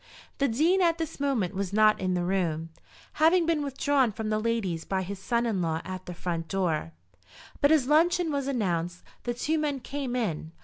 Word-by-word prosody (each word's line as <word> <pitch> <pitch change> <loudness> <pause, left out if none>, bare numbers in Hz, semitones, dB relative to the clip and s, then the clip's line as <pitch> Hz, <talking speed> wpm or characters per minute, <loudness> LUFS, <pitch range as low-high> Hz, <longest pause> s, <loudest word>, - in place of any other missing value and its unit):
The 280 - +3
Dean 320 +11 +2
at 335 -2 +3
this 325 -4 -5
moment 250 -10 0
was 195 -1 -3
not 215 +1 +4
in 185 -1 0
the 175 - 0
room, 165 -3 -1 0.5
having 335 +2 +5
been 325 -2 +1
withdrawn 275 -2 +1
from 220 +1 -4
the 215 - +1
ladies 215 -8 -1
by 190 -1 -1
his 195 +1 -6
son 235 +4 0
in 210 -6 0
law 160 -1 0
at 185 -1 -7
the 180 - -6
front 165 -1 -3
door; 165 - -1 0.7
but 285 +1 +5
as 305 -5 +4
luncheon 330 +3 +3
was 280 -2 -1
announced, 180 -9 -1 0.2
the 240 -1 -1
two 310 +6 0
men 290 -3 -1
came 265 -1 -4
in. 165 -9 -2
225 Hz, 195 wpm, -28 LUFS, 180-285 Hz, 0.7 s, having